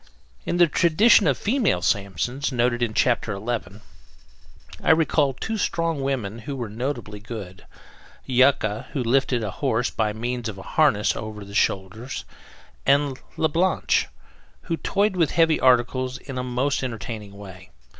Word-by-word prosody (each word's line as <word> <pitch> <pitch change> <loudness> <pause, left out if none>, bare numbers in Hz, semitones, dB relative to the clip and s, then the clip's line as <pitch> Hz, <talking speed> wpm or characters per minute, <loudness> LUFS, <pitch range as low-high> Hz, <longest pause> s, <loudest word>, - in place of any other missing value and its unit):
In 175 - 0
the 175 - +7
tradition 170 +5 +4
of 135 - +2
the - - -16
"Female 210 - +1
Sampsons" 100 - -1
noted 120 -1 +1
in 110 -2 -1
Chapter 115 -3 +1
Eleven, 105 -1 -4 1.0
I - - -1
recall 155 -3 +3
two 220 - -4
strong 165 -6 -1
women 120 -6 -2
who 135 +5 -6
were 120 -5 -5
notably 115 -3 -4
good; 105 -4 -9 0.6
Yucca, 125 -5 +2
who 135 -5 -1
lifted 125 0 +1
a 105 - -3
horse 125 -1 -1
by 110 -2 0
means 120 +2 -3
of 100 - -7
a 95 - -9
harness 135 -10 +2
over 105 -1 -7
the 100 - -12
shoulders; 105 +6 -1 0.6
and 140 -1 +2 0.2
La 160 - +2
Blanche, 175 +5 +1 0.6
who 165 -2 -2
toyed 200 +3 0
with 165 -5 +2
heavy 165 -2 +3
articles 130 +1 +2
in 135 -2 -7
a - - -2
most 125 +3 -1
entertaining 110 -4 -6
way. 95 -3 -11
125 Hz, 155 wpm, -24 LUFS, 110-145 Hz, 1.0 s, the